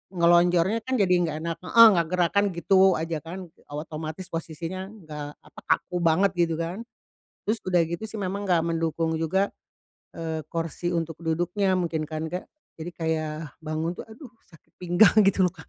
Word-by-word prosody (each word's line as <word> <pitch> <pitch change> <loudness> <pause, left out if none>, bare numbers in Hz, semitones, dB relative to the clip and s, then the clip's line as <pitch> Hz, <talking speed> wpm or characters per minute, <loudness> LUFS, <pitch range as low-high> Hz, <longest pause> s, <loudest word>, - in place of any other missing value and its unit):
ngelonjornya 175 +4 +4
kan 260 0 -1
jadi 195 -6 +3
gak 155 -1 -3
enak, 165 0 -3
heeh, 230 +5 +8
nggak 170 -4 +1
gerakan 180 +3 +2
gitu 190 +2 +4
aja 160 +1 -2
kan, 175 +3 -8 0.2
otomatis 155 +3 -6
posisinya 170 +3 -5
nggak 155 -8 -8 0.2
apa - - -14
kaku 180 - 0
banget 175 +3 +3
gitu 170 -2 +2
kan, 170 +5 -4 0.7
terus 220 +2 +1
udah 180 -2 +3
gitu 170 +6 -5
sih 220 0 -7
memang 195 +2 -3
nggak 175 -4 +3
mendukung 165 0 -1
juga, 190 +5 +1 0.6
eee, 160 -1 -4
kursi 165 +1 -3
untuk 165 -2 -2
duduknya 175 +4 0
mungkin 165 -3 -1
kan 155 0 -4
Kak, 180 +3 -5 0.3
jadi 165 +2 -6
kayak 160 -2 -2 0.3
bangun 155 +2 -2
tuh, - - -7
aduh, 245 +3 -12 0.2
sakit 160 - -21
pinggang 180 +5 +5
gitu 195 -1 +3
loh 180 - -3
Kak. 160 -4 -14
170 Hz, 170 wpm, -26 LUFS, 160-185 Hz, 0.7 s, heeh